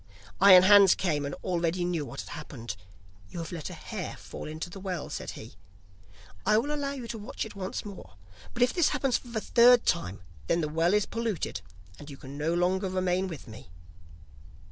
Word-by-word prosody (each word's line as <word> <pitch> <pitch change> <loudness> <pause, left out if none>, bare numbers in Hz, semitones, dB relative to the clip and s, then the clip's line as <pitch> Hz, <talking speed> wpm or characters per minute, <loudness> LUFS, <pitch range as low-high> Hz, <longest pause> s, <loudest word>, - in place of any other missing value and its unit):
Iron 185 -2 +9
Hans 200 -1 +8
came, 150 -6 -1
and 140 - -5
already 175 0 0
knew 175 -3 -1
what - - -6
had - - -11
happened. 115 -7 -7 0.5
'You - - -9
have 165 -1 -5
let 165 -4 -5
a - - -8
hair - - -6
fall - - -8
into 155 +3 -5
the 180 +3 -10
well,' 185 -5 -4
said - - -5
he. - - -10 0.9
'I 215 - +4
will 285 +7 0
allow 280 -1 -2
you 255 -4 -7
to 225 - -5
watch 205 - -5
by - - -5
it 220 - -10
once 190 +1 -4
more, 195 - -10 0.4
but 245 - +3
if 245 - +2
this 345 -4 +3
happens 270 -3 +1
for - - -16
the 230 -2 -3
third 240 +2 +5
time 100 - -1 0.3
then 170 - +2
the 150 - -2
well 165 +5 +2
is 210 -1 +2
polluted 225 - -3 0.4
and 145 - -10
you 140 - -9
can 135 0 -10
no 155 +4 -1
longer 185 +2 +1
remain 185 0 0
with 165 -6 -8
me. 110 -5 -12
185 Hz, 210 wpm, -28 LUFS, 160-215 Hz, 0.9 s, Iron